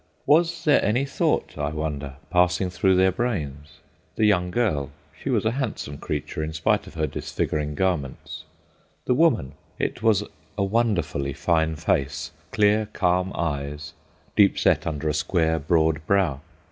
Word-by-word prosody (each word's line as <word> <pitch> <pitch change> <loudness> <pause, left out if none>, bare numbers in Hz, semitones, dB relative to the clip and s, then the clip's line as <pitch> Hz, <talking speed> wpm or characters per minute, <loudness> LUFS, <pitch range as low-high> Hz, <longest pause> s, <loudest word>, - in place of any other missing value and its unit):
Was 165 +2 +3
there 150 - +4
any 120 +6 +1
thought, 135 - -1
I 75 -1 0
wonder, 75 -3 -4 0.2
passing 90 +1 +2
through 95 +1 +2
their 95 +1 +4
brains? 80 - -3 0.4
The 110 - +2
young 90 -4 +3
girl—she 75 - -3
was - - +1
a 110 - +3
handsome 120 - -4
creature 80 - -3
in 80 +1 -4
spite 75 - +1
of - - -12
her 80 -1 0
disfiguring 75 -1 -3
garments. 80 -7 -2 0.6
The - - +2
woman—it 125 - 0
was 110 -3 +3 0.3
a 100 - +1
wonderfully 95 - 0
fine 80 +2 +1
face: 75 -3 -1 0.2
clear, 105 +1 +2
calm 90 0 +1
eyes, 70 -2 -3 0.4
deep 100 -2 +5
set - - +2
under 80 -1 -2
a 75 - +1
square 80 +1 +1
broad 80 0 +1
brow. 90 -9 +2
85 Hz, 145 wpm, -24 LUFS, 75-105 Hz, 0.6 s, deep